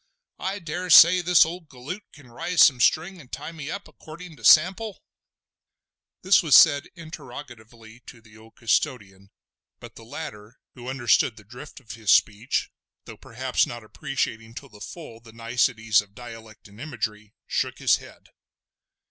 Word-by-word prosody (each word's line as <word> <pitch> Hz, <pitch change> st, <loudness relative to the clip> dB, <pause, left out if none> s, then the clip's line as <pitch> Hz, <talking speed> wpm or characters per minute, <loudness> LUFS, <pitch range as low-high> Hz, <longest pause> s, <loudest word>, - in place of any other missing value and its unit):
I 195 Hz, +2 st, -3 dB
dare 180 Hz, 0 st, -6 dB
say 170 Hz, +3 st, +8 dB
this 175 Hz, -2 st, +5 dB
old 165 Hz, -1 st, -9 dB
galoot 140 Hz, +10 st, -8 dB
can 135 Hz, -5 st, -18 dB
rise 170 Hz, +6 st, +2 dB
some 130 Hz, -4 st, +4 dB
string 170 Hz, +8 st, +1 dB
and 130 Hz, -, -19 dB
tie 160 Hz, -, -7 dB
me 155 Hz, -3 st, -8 dB
up 200 Hz, -, -7 dB
accordin' 165 Hz, +1 st, -13 dB
to 115 Hz, -, -18 dB
sample?" 185 Hz, -, +3 dB, 1.2 s
This 190 Hz, +2 st, +4 dB
was 155 Hz, -7 st, +4 dB
said 145 Hz, -1 st, +6 dB
interrogatively 120 Hz, -8 st, -12 dB
to 115 Hz, -, -12 dB
the 110 Hz, -1 st, -20 dB
old 110 Hz, 0 st, -18 dB
custodian, 100 Hz, -4 st, -2 dB, 0.5 s
but 120 Hz, -1 st, -13 dB
the 115 Hz, -, -13 dB
latter, 110 Hz, -3 st, -9 dB, 0.2 s
who 125 Hz, 0 st, -9 dB
understood 120 Hz, -3 st, +1 dB
the 105 Hz, -, -14 dB
drift 125 Hz, +9 st, -12 dB
of 125 Hz, -5 st, -13 dB
his 110 Hz, -3 st, -7 dB
speech, 105 Hz, +5 st, +1 dB, 0.3 s
though -, -, -11 dB
perhaps 125 Hz, +2 st, -2 dB
not 120 Hz, -1 st, -8 dB
appreciating 115 Hz, -3 st, -5 dB
to 140 Hz, -, -10 dB
the 105 Hz, -2 st, -17 dB
full 115 Hz, -2 st, -10 dB
the 115 Hz, -1 st, -17 dB
niceties 115 Hz, -2 st, +1 dB
of 100 Hz, -1 st, -20 dB
dialect 115 Hz, -3 st, -12 dB
and 105 Hz, +3 st, -15 dB
imagery, 110 Hz, -8 st, -6 dB
shook -, -, -3 dB
his -, -, +2 dB
head. -, -, -16 dB
125 Hz, 160 wpm, -24 LUFS, 110-160 Hz, 1.2 s, say